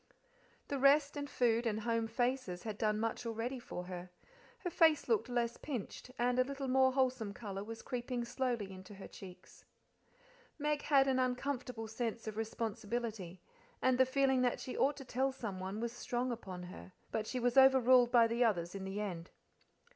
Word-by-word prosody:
The 280 - -1
rest 285 +2 +5
and 285 0 -4
food 235 -2 +2
and 220 0 -1
home 230 0 0
faces 240 -6 -1
had 215 -2 -5
done 215 -1 +1
much 225 +1 -2
already 230 +3 -3
for 180 -6 -6
her; 180 0 -7 0.5
her 355 - -3
face 320 -2 +4
looked 440 - +1
less 235 -1 0
pinched, 250 -3 -6
and 245 +1 +1
a - - +6
little 275 +1 -5
more 260 0 +4
wholesome 255 -6 0
colour 200 -3 -5
was 225 +1 -8
creeping 245 -1 -3
slowly 235 -5 -2
into 190 +2 -10
her 195 - -9
cheeks. 185 -2 -13 0.9
Meg 295 -1 0
had 275 -2 +4
an 260 -1 +2
uncomfortable 250 -2 -2
sense 225 0 -3
of 215 -1 -5
responsibility, 220 -4 -4 0.4
and 255 0 +2
the 260 - +7
feeling 265 -1 +2
that 245 -1 +1
she 255 - -6
ought 280 +2 +2
to 270 - -8
tell 265 +2 0
someone 200 -5 -5
was 235 0 -2
strong 245 +1 -2
upon 190 -6 -6
her; 180 +1 -10 0.2
but 215 -1 -2
she 255 - -2
was 245 0 +1
overruled 260 -2 +6
by 235 -2 +7
the 230 +2 +1
others 175 -7 +1
in 195 -1 -5
the 195 +2 -4
end. 180 -5 -4
240 Hz, 180 wpm, -35 LUFS, 215-260 Hz, 0.9 s, the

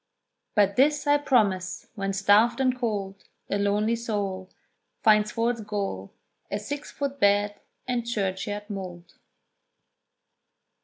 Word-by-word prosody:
"But 200 -2 +3
this 290 +3 +3
I 290 0 +4
promise, 200 -10 +1
when 195 -3 -2
starved 205 +6 +4
and 260 -1 +2
cold 205 -5 -3 0.3
A 200 - +1
lonely 210 +3 +2
soul 200 -5 -3 0.5
Finds 215 -2 +5
for 230 +1 +1
its 235 -2 -6
goal 200 - -4 0.4
A 205 - -1
six 285 +8 -5
foot 280 -1 -4
bed 205 -1 +3 0.3
and 245 -2 0
churchyard 205 -2 -3
mould." 180 -4 -7
210 Hz, 120 wpm, -26 LUFS, 195-235 Hz, 0.5 s, Finds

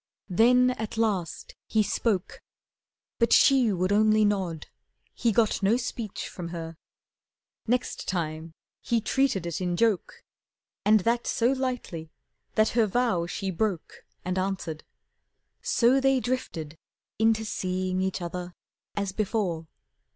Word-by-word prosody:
Then 250 +6 +5
at 220 -2 -5
last 200 -7 -1
he 220 -1 +2
spoke, 205 -1 -1 0.8
But 235 -1 +3
she 260 -5 +6
would 185 0 0
only 215 +1 +4
nod, 185 -6 -1 0.5
he 235 - +1
got 220 0 +2
no 205 +4 +3
speech 235 -4 -4
From 175 -2 -7
her. 165 -1 -6 0.9
Next 245 +2 -1
time 160 -2 -3 0.3
he 235 - +1
treated 225 -5 +1
it 170 +1 -3
in 175 -1 -1
joke, 220 -4 0 0.6
And 215 0 +5
that 235 +4 0
so 235 +2 +2
lightly 250 -12 -3 0.5
that 215 0 +4
her 230 -2 +2
vow 210 -6 +1
she 195 +2 -3
broke 190 -2 -3 0.2
And 185 +1 -1
answered. 185 -5 -3 0.8
So 250 +3 +3
they 270 -1 +3
drifted 165 -12 -4 0.4
into 220 0 +3
seeing 185 -2 -2
Each 190 -1 -2
other 175 +1 -5 0.4
as 200 -2 -1
before. 190 -6 -1
205 Hz, 130 wpm, -27 LUFS, 180-230 Hz, 0.9 s, she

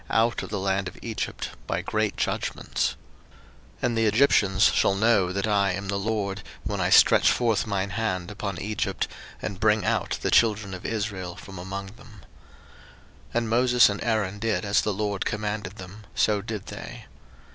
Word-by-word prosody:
02:007:005 100 -2 -1 0.9
And 120 - +1
the 115 -1 +2
Egyptians 105 -4 +4
shall 100 - +3
know 100 -3 +3
that 100 +2 -1
I 100 -3 +2
am 95 +1 -5
the 100 - 0
LORD, 100 -2 -2 0.2
when - - -2
I - - +1
stretch - - +6
forth 115 -3 +1
mine 100 -1 -1
hand 95 -6 -2
upon 100 -3 -4
Egypt, 105 -1 -2 0.4
and 95 - -4
bring 110 -1 +3
out - - 0
the - - 0
children 105 -4 +3
of 90 - -6
Israel 100 -5 -3
from 95 -2 -10
among 95 +2 -6
them. 110 -4 -15 1.1
02:007:006 - - -20
And 120 -1 +1
Moses 125 +1 +5
and 100 - -3
Aaron 105 -3 0
did 110 -1 -1
as 100 0 +3
the 105 - -1
LORD 100 -1 -2
commanded 105 -2 -3
them, 100 +2 -11
so 105 -2 +2
did 110 -1 -5
they. - - -8
105 Hz, 145 wpm, -26 LUFS, 95-110 Hz, 1.1 s, stretch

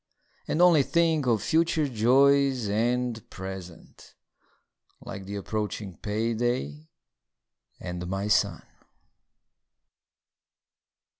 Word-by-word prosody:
And 170 - +2
only 170 -5 +6
think 160 -1 +1
of 110 -4 +2
future 160 +2 +1
joys 135 +1 +3
and 120 +2 0
present, 95 -2 -10 0.8
Like 95 - -8
the 100 +1 -6
approaching 105 -1 -4
payday, 110 - -2 0.9
and 90 -1 -6
my 95 +2 -2
son. 105 - +1
115 Hz, 80 wpm, -27 LUFS, 95-135 Hz, 0.9 s, only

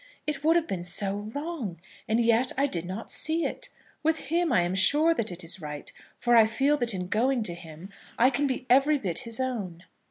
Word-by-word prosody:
"It 295 -2 -3
would 325 +2 +4
have 340 -2 +2
been 190 - -4
so 200 +4 0
wrong. 285 - -5 0.3
And 220 +2 +1
yet 235 +2 +2
I 275 - +3
did 175 -11 -2
not 190 +5 -6
see 325 +1 0
it! - - -4 0.3
With 320 -3 -1
him 340 -2 +2
I 235 - +4
am 175 +1 -2
sure 295 - +5
that 230 - -2
it 175 +1 -7
is 170 +2 -1
right, 150 -1 -7 0.3
for 240 0 +2
I 225 -2 +7
feel 270 +7 +2
that 240 -6 0
in 180 -1 -3
going 240 +5 +1
to 175 - -2
him 170 +2 -11 0.3
I 250 +3 +5
can 280 +3 0
be 260 -1 -3
every 275 +4 +4
bit 185 -10 -3
his 230 -1 -2
own." 205 -10 -4
235 Hz, 220 wpm, -27 LUFS, 185-285 Hz, 0.3 s, I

